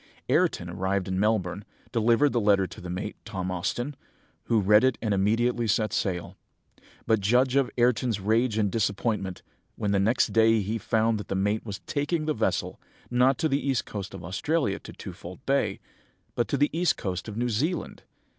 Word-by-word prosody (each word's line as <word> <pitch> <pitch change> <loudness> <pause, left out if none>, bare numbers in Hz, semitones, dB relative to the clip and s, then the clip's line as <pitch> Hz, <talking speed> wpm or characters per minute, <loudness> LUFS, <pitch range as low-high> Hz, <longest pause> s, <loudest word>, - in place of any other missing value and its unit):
"Ayrton, 90 - +2
arrived 95 +1 -1
at 95 - -2
Melbourne, 100 -1 0 0.3
delivered 120 +5 +3
the 120 - +2
letter 100 -2 +4
to 90 - -10
the 90 - -7
mate, 90 +4 -4
Tom 95 -4 -4
Austin, 120 +10 -2 0.5
who 115 - +2
read 105 +3 +5
it 130 -1 +3
and 110 -3 0
immediately 115 +4 +1
set 110 +1 +1
sail; 90 -3 -2 0.7
but 110 -1 +3
judge 125 +6 +2
of 135 -3 +3
Ayrton's 120 -2 +2
rage 110 +3 +1
and 105 -3 +1
disappointment, 100 -3 -1 0.3
when 105 - -1
the 100 - +2
next 110 +6 +2
day 115 -1 +4
he 110 +4 -2
found 110 0 +1
that 105 - -7
the - - -2
mate 105 +3 0
was 105 -3 -6
taking 155 +2 -1
the 155 - +1
vessel, 110 -4 -1 0.3
not 125 +2 +4
to 160 - +1
the 140 -1 0
east 135 -3 0
coast 100 -2 -6
of 90 - -9
Australia, 100 - -1
to - - -11
Twofold 90 +8 -10
Bay, 140 +1 +1 0.5
but 120 - 0
to 140 - 0
the 145 +2 +1
east 175 -1 +2
coast 95 0 -4
of 110 -1 -6
New 120 +1 0
Zealand. 150 - -2
110 Hz, 185 wpm, -27 LUFS, 100-125 Hz, 0.7 s, read